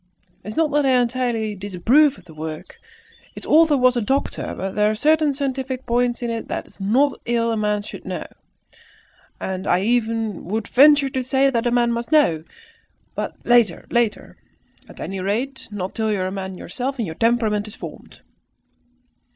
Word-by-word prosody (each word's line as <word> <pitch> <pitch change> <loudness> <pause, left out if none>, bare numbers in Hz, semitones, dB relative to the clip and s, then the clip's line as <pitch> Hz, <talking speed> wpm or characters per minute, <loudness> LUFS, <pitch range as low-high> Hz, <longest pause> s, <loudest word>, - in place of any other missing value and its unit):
"It - - -12
is 215 - -6
not 320 -2 +2
that 295 0 +2
I 260 -2 +4
entirely 240 -3 -1
disapprove 205 - +2
of 185 - -17
the 165 - -14
work. 155 0 -7 0.6
Its - - -7
author 315 -2 +5
was 255 -1 +4
a 240 - +1
doctor! 270 +6 -2 0.2
There 210 0 +2
are 215 - -1
certain 305 +4 +3
scientific 265 -2 -3
points 240 0 0
in 235 - -1
it 230 0 -4
that - - -4
it - - -19
is - - -22
not 250 +9 +1
ill 230 -1 +1
a - - 0
man 210 -1 0
should 215 - -9
know, - - -5 1.1
and 190 0 -4
I - - +4
would - - -2
even 225 -4 -1
venture 285 +1 +6
to 260 0 -2
say 265 +2 +2
that 235 -1 0
a - - +3
man 240 0 +2
must 235 +3 -3
know. 225 - +3 0.7
But - - -4
later 235 -7 +3
later! 235 -3 -1 0.5
At - - -14
any 195 0 -5
rate, 235 +8 -3
not 195 -3 -5
till 220 -1 -1
you 200 -3 -1
are 185 0 -2
man 190 -1 -5
yourself 260 +11 -4
and 230 - -1
your 160 - -5
temperament 220 0 +1
is 215 - -10
formed." - - -11
235 Hz, 185 wpm, -21 LUFS, 205-265 Hz, 1.1 s, venture